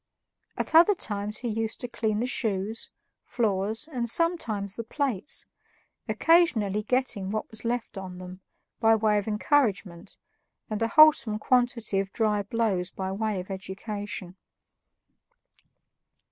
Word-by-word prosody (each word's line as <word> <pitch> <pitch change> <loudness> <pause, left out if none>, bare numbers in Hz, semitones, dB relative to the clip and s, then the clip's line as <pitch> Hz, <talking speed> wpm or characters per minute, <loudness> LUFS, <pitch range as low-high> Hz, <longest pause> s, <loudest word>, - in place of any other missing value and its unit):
At - - -3
other 345 +6 +7
times 210 - -3
he 245 - -3
used 225 0 -2
to 245 - -3
clean 220 -2 -1
the - - 0
shoes, 220 -3 -1 0.3
floors, 220 +3 -1
and 245 -6 -3
sometimes 225 - +1
the 230 - -5
plates, 270 -1 -2 0.6
occasionally 220 - +3
getting 225 -4 -1
what 215 +1 -3
was 220 - -5
left 235 -3 -3
on 185 -1 -8
them, 185 +1 -10 0.4
by 225 0 +5
way 215 -1 +2
of 205 - -7
encouragement, 210 - 0 0.5
and 215 - -2
a 225 - +2
wholesome 235 -6 +6
quantity 240 -3 +1
of 195 0 -3
dry 210 -2 +1
blows 200 -4 -1
by 190 0 -5
way 210 0 -2
of 185 +2 -7
education. 195 0 -6
215 Hz, 130 wpm, -27 LUFS, 200-240 Hz, 0.6 s, other